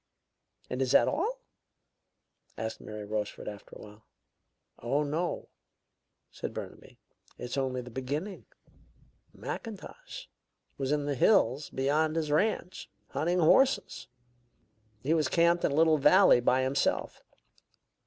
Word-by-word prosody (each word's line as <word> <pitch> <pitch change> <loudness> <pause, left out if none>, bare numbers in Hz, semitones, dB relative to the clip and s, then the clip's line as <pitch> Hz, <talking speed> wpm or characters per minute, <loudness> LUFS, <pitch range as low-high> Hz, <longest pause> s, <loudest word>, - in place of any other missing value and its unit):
"And 125 - -4
is 130 -1 +1
that 120 - +6
all?" 455 +11 -1 1.2
asked 110 0 -5
Mary 105 -1 -7
Rochefort, 105 0 -4
after 105 -1 -9
a - - -11
while. 105 +1 -15 0.7
"Oh, 140 +6 0
no," 160 +4 -3 0.8
said - - -6
Burnaby; - - -9 0.4
"it's 125 +1 -5
only 130 -2 -1
the 125 0 -11
beginning. 145 - -5 0.8
Mackintosh 470 - -8 0.5
was 135 0 -1
in 150 -1 0
the 145 - -1
hills 140 - +3
beyond 150 +4 0
his 155 -2 -1
ranch, 185 +2 -1 0.2
hunting 170 +5 0
horses. 260 +11 +3 1.0
He 150 +5 +2
was 155 -2 +2
camped 170 0 +3
in - - +2
a - - -1
little 160 0 +4
valley 150 0 +6
by 130 +2 +2
himself. 135 +2 -1
145 Hz, 125 wpm, -29 LUFS, 125-170 Hz, 1.2 s, that